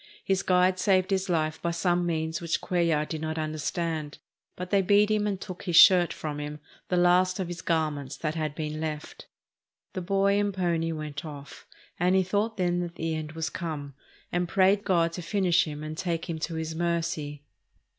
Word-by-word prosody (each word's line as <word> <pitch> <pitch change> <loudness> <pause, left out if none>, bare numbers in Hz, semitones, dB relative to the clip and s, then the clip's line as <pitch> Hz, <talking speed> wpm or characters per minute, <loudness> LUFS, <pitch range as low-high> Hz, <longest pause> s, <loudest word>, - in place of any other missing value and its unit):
His 195 0 +1
guide 185 0 +3
saved 185 -1 +2
his 190 0 0
life 155 -2 0
by 170 - 0
some 175 +1 +1
means 160 0 -2
which 170 -1 -1
Cuellar 170 -4 +1
did 160 -1 -5
not 160 0 -3
understand. 155 0 -3 0.4
But 180 0 -6
they 200 -1 +4
beat 205 +3 +4
him 210 -1 +1
and 195 -2 -2
took 185 -1 -8
his 175 -3 -1
shirt 180 0 +8
from 150 -1 -5
him, 150 +1 -5 0.3
the 180 - +1
last 180 +1 +3
of 185 - -2
his 175 -1 -6
garments 150 -5 -1
that 155 -1 -2
had 155 -2 -3
been 155 -1 -4
left. 155 -1 -5 0.7
The 185 - -3
boy 195 +2 +2
and 205 -1 0
pony 170 -3 0
went 150 -2 -5
off, 145 -3 -10 0.3
and 180 +2 +3
he 190 - +4
thought 210 +4 -1
then 175 -1 +1
that 175 -1 -4
the 165 -1 -2
end 155 0 -5
was 160 -1 -3
come 150 -5 -5 0.4
and 175 -1 -1
prayed 195 +2 +3
God 170 -3 +2
to 180 - -5
finish 180 0 +2
him 150 -1 -6
and 155 0 -5
take 165 -1 -2
him 165 -2 -4
to 165 +1 -3
His 160 0 -3
mercy. 160 -3 -2
170 Hz, 195 wpm, -27 LUFS, 155-185 Hz, 0.7 s, shirt